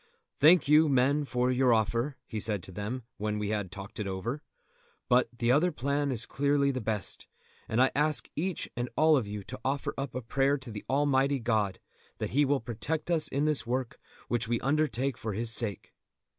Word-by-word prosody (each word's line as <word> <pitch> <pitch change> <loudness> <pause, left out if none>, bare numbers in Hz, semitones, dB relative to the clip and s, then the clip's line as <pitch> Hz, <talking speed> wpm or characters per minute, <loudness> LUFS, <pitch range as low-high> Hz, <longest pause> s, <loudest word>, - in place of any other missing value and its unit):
"Thank 165 +3 +6
you, 150 +1 +6
men, 140 +3 +2
for 125 -1 0
your 125 -2 +4
offer," 115 +5 0
he 110 - -5
said 105 -3 -1
to 95 - -9
them, 105 +7 -4
when 105 0 -2
we 105 -1 -2
had 105 -4 -2
talked 100 +3 -9
it 105 - -2
over; 110 +10 -3 0.7
"but 125 0 +3
the 120 0 0
other 160 +7 +3
plan 140 0 -1
is 125 -1 -4
clearly 140 0 +1
the 130 -2 -3
best, 105 -4 -3 0.4
and 110 - 0
I 130 +1 +5
ask 150 -3 +1
each 180 +2 -2
and 120 0 -3
all 155 0 +5
of 125 -7 0
you 105 -1 -5
to 130 - -8
offer 135 +2 -1
up 135 -3 -4
a 130 - -2
prayer 135 +5 +1
to 115 -6 -7
Almighty 140 0 +2
God 110 -6 0 0.4
that - - -3
He 145 +3 +3
will 140 0 +2
protect 150 +9 -3
us 165 -2 +2
in 140 +2 0
this 150 -6 0
work 125 0 -2 0.3
which 120 -1 -1
we 115 0 0
undertake 135 -3 0
for 110 -2 -3
His 115 +3 0
sake." 110 -3 0
125 Hz, 200 wpm, -29 LUFS, 110-140 Hz, 0.7 s, Thank